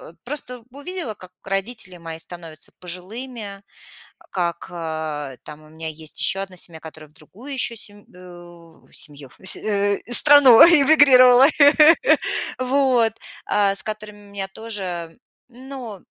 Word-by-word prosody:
э, - - -13
просто 250 -3 -6
увидела, 285 - -6
как 185 -2 -16
родители 195 -1 -5
мои 165 -1 -9
становятся 165 -2 -8
пожилыми, 200 +3 -8 0.7
как, 170 -2 -4
э, 155 -5 -6
там 150 0 -12
у 155 - -18
меня 160 0 -7
есть 155 0 -8
еще 195 - 0
1 190 -2 -8
семья, 165 -2 -6
которая 155 -1 -13
в 150 - -32
другую 215 - -11
еще 240 -3 -2
семь 205 -1 -8
э, - - -16
в 175 -2 -16
семью, 145 -3 -7
с 190 - -1
э, 205 -1 -1
страну 275 -3 +7
эмигрировала, 275 -5 +7 1.1
вот. 255 -3 +1 0.3
А, 200 -1 +1
с - - -3
которыми 210 -1 -8
у - - -18
меня 195 -1 -5
тоже, 190 -6 -5 0.3
ну, 250 -4 -10
200 Hz, 135 wpm, -21 LUFS, 170-245 Hz, 1.1 s, страну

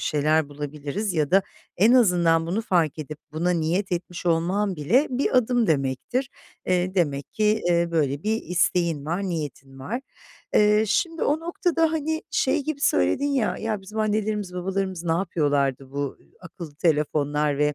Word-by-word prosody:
şeyler 155 0 +1
bulabiliriz 145 +7 -4
ya 150 -3 0
da 195 +1 +5 0.3
en 215 +6 +5
azından 175 -9 +4
bunu 195 +7 -1
fark 170 -8 +1
edip 155 0 -6
buna 165 +3 0
niyet 175 +3 0
etmiş 175 0 -4
olman 180 +4 +1
bile 230 - +2
bir 255 +1 0
adım 245 -1 +3
demektir. 155 - -1 0.4
Eee, 185 0 +1
demek 145 -7 -1
ki, 215 - -1 0.2
eee, 170 0 +2
böyle 145 -3 0
bir 220 +1 -1
isteğin 175 -4 0
var, 170 +6 -2
niyetin 145 -7 -5
var. 215 - -4 0.5
Eee, 210 +1 +5
şimdi 325 - 0
o 300 +2 +1
noktada, 330 -1 0
hani, 315 0 -2
şey 280 +1 +1
gibi 310 -1 -3
söyledin 95 - +2
ya, 260 -6 0
“Ya, 220 -2 -3
bizim 210 +3 -8
annelerimiz 210 -3 -1
babalarımız 190 -1 -3
ne 165 - +1
yapıyorlardı 145 -7 0
bu 140 -1 -3 0.2
akıllı 170 -4 -10
telefonlar 150 -2 +1
ve 150 0 +2
175 Hz, 155 wpm, -24 LUFS, 150-215 Hz, 0.5 s, da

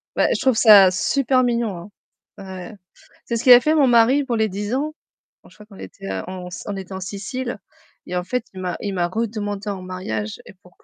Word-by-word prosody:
Bah, - - +3
je - - -2
trouve 260 -2 +2
ça 205 -5 +7
super 255 +8 +1
mignon. 225 -6 -2 0.5
Ouais, 190 0 -8
tu - - -13
sais, - - -24 0.5
c'est 235 - -2
ce 225 - -4
qu'il 250 - +9
a 245 - +8
fait 310 +4 +2
mon 290 -4 +4
mari 245 +4 +4
pour 250 -3 -2
les 220 -1 +1
10 205 +3 -4
ans. 295 +4 -1 0.5
Oh - - -18
je - - -21
crois 210 - -15
qu'on 205 -2 -16
était 95 +1 -9 0.2
on 185 +2 -7
était 195 0 -8
en 190 - -5
Sicile 205 +6 -5 0.5
et 180 - -5
en 180 - -2
fait 250 +3 -2
il 190 - -9
m'a 180 -2 -3
il 200 - -3
m'a 175 -2 0
redemandé 205 0 -3
en 195 -2 -5
mariage 110 - -5
et - - -13
pour 180 -1 -22
205 Hz, 225 wpm, -21 LUFS, 185-240 Hz, 0.5 s, qu'il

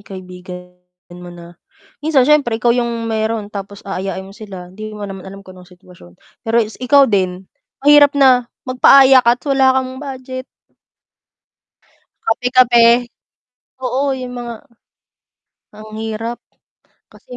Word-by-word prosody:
kaibigan 180 -2 -11 0.4
mo 180 0 -11
na 175 0 -12 0.5
minsan 290 -4 +2
siyempre, 280 -6 +2
ikaw 235 +1 +1
yung 235 -1 -2
meron 220 -1 -3
tapos 200 0 -8
aayain 195 -1 -5
mo 195 - -13
sila, 190 -4 -11
hindi 215 +2 -8
mo 205 - -7
naman 195 -2 -8
alam 195 0 -12
kung 185 - -13
anong 180 -1 -16
sitwasyon. 175 - -18 0.3
Pero 225 +1 -1
is 215 +3 -12
ikaw 275 +2 +5
din, 190 -5 -1 0.4
mahirap 290 -1 +6
na 255 -3 +4 0.2
magpaaya 260 +1 +6
ka 240 0 +2
at - - -35
wala 270 -1 +3
kang 260 0 -2
budget. 260 -2 -7 1.8
Kape-kape. 245 0 +3 1.0
Oo, 260 +2 -2 0.2
yung 250 -1 -7
mga 240 -1 -6 1.2
ang 215 +1 -13
hirap. 225 +2 -5 0.8
Kasi 250 - -13
225 Hz, 130 wpm, -17 LUFS, 195-255 Hz, 1.8 s, mahirap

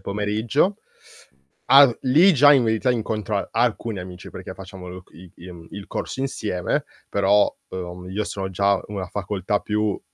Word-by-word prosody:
pomeriggio. 105 - 0 1.0
All 135 -3 +8
lì 160 +9 +5
già 145 +2 +7
in 130 -4 +4
verità 110 +3 +1
incontro 110 -3 -2
a - - -3
alcuni 110 -5 0
amici, 90 0 -9
perché - - -8
facciamo 95 -1 -10
loc 90 0 -11
i 90 +1 -14
im 85 -1 -12
il 100 -1 -8
corso 130 - -5
insieme. 105 -9 -2 0.2
Però, 100 +1 +3
uhm, 90 0 -7
io 105 +2 -2
sono 95 -1 -4
già 100 +1 +1
una 100 -3 -5
facoltà 100 +1 -2
più 105 -1 -1
100 Hz, 155 wpm, -23 LUFS, 95-115 Hz, 1.0 s, All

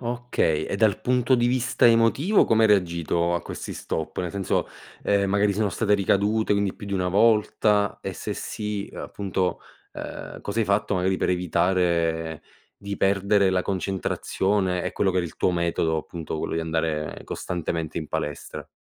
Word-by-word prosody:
Okay. 120 -10 0
E - - -3
dal 105 -1 +2
punto 125 +1 +2
di 120 -1 +2
vista 125 0 +2
emotivo 115 - +4
come 110 0 +3
hai 110 - +5
reagito 85 -3 +1
a 85 - 0
questi - - -6
stop? 80 - -4
Nel 90 -2 -3
senso, 100 -2 -1 0.3
ehm, 100 -1 +2
magari 100 +1 +2
sono 105 0 0
state 105 0 +1
ricadute, 105 +2 +2
quindi 100 -1 0
più 100 - -9
di 100 - -5
1 90 -2 0
volta 105 0 +3
e - - -4
se - - -5
sì, 105 -1 -4
appunto, 95 -2 -2 0.3
ehm, - - -7
cos'hai 110 +2 -1
fatto 100 +1 +1
magari 95 +1 +1
per - - 0
evitare 85 -3 0 0.3
di 100 0 -6
perdere 100 0 +3
la 90 -1 +1
concentrazione 95 0 -1
e 90 - -2
quello 95 - +1
che 95 - -2
era 90 - +1
il 80 - -12
tuo - - +2
metodo, 85 -2 0
appunto, 80 0 -5
quello - - -3
di 80 - 0
andare 80 -2 -2
costantemente 85 -2 -3
in 80 - -5
palestra. 75 -1 -5
95 Hz, 170 wpm, -25 LUFS, 85-105 Hz, 0.3 s, hai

